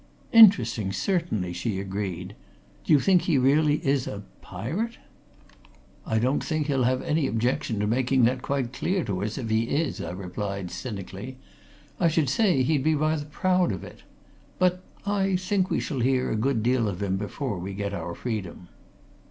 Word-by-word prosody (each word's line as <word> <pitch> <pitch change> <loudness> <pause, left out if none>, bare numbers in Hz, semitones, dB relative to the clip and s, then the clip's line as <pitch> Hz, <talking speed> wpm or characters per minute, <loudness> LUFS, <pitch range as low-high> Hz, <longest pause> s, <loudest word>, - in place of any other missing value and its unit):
"Interesting, 120 - +6
certainly," 110 - -1
she 95 +3 -2
agreed. 95 -2 -4 0.5
"Do - - -1
you 145 - +7
think 185 +3 +4
he 160 -6 +1
really 145 +3 +4
is 135 -2 +1
a 105 0 -6 0.2
pirate?" 160 - -4 1.1
"I 110 - +1
don't 125 +5 +1
think 155 -2 -1
he'll 135 -4 +1
have 130 +1 +1
any 150 -2 +1
objection 125 +1 -1
to 105 - +1
making 125 +3 +2
that 125 +2 +2
quite 130 -3 -2
clear 185 +7 -1
to 100 -2 -3
us 105 +1 -3
if 115 -5 -4
he 110 +1 +2
is," 145 +5 -1
I 80 - -4
replied, 95 0 -5
cynically. 105 +2 -7 0.6
"I 175 - +4
should 155 -4 +1
say 175 - +3
he'd 145 0 +1
be 155 +1 +3
rather 155 0 0
proud 180 +3 +1
of 95 -3 -5
it. - - -12 0.6
But 180 0 +2 0.2
I 195 -2 +1
think 185 +1 0
we - - 0
shall 140 -6 -3
hear 130 +1 +1
a - - 0
good 115 0 0
deal 120 -1 +2
of 100 0 -3
him 95 -1 0
before 105 +1 -4
we 95 +2 -5
get 100 0 -3
our 85 -2 -4
freedom." 95 -7 -5
130 Hz, 175 wpm, -26 LUFS, 105-155 Hz, 1.1 s, you